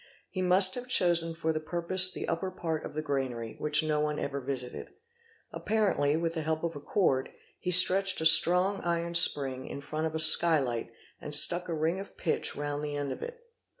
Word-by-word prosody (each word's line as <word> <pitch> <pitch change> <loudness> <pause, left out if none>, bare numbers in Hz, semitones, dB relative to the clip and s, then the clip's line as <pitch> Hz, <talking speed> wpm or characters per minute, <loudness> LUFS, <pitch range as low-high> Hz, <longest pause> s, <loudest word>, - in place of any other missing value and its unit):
He 185 - -5
must 185 +1 +4
have 250 0 -8
chosen 170 -7 +2
for 160 -1 -3
the 155 - -4
purpose 175 +3 +2
the - - -7
upper 170 +3 -4
part 165 -4 -6
of - - -10
the 155 - -5
granary 130 -6 -5
which 150 +1 +1
no 155 -1 -2
one 150 0 -3
ever 140 0 -5
visited. 125 -2 -7 0.6
Apparently, 200 -9 -2
with 165 0 -4
the 160 - -5
help 160 +1 -4
of 165 -1 -5
a - - -8
cord, 140 -5 -2 0.3
he 180 - -6
stretched 185 +2 +5
a 160 - -4
strong 180 +5 +4
iron 170 0 -3
spring 135 -6 +3
in - - -8
front 155 +3 -5
of 160 - -8
a - - -3
sky 160 +1 +6
light 120 -5 -5 0.3
and 150 0 -3
stuck 175 +4 +4
a 165 - -4
ring 160 +4 -3
of 200 - -11
pitch 165 - -3
round 145 0 -6
the 145 -1 -6
end 145 -1 -5
of - - -9
it. 485 0 -10
160 Hz, 210 wpm, -27 LUFS, 145-180 Hz, 0.6 s, sky